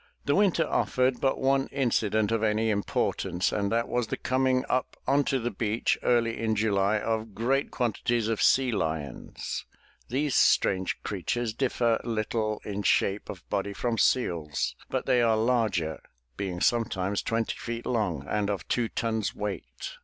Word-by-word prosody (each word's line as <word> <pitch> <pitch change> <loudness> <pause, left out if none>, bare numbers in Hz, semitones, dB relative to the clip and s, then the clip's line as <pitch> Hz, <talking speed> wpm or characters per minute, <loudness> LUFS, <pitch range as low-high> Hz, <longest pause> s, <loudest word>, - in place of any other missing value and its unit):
The 145 - +2
winter 190 -3 +3
offered 130 -1 +1
but 135 -1 +1
one 135 0 +2
incident 110 -5 +1
of 115 -1 +1
any 110 0 +2
importance 95 -3 0
and 100 -1 -1
that 115 +1 +1
was 120 -2 -1
the - - -3
coming 130 0 +1
up 130 - -1
onto 140 0 +2
the 120 -1 -2
beach 110 0 0
early 115 -2 +2
in 110 -1 0
July 105 -1 +2
of 110 -1 -2
great 130 +6 +1
quantities 120 -1 0
of 115 -2 -1
sea 130 -1 +4
lions. 80 - -4 0.4
These 140 +2 0
strange 95 -1 +3
creatures 110 +4 -2
differ 120 -2 +1
little 110 -1 -2
in 105 0 -3
shape 100 +1 +1
of 95 - -8
body 100 0 -1
from 115 +2 -1
seals 85 - +1
but - - -2
they 125 - +3
are 115 -2 +3
larger 110 - +1 0.3
(being 90 -3 -4
sometimes 100 -4 +1
twenty 115 0 -1
feet 120 0 -5
long 95 - -1
and 105 -1 0
of 100 -2 -3
two 120 -2 0
tons 110 -3 -2
weight). 105 -1 -6
110 Hz, 155 wpm, -28 LUFS, 100-120 Hz, 0.4 s, sea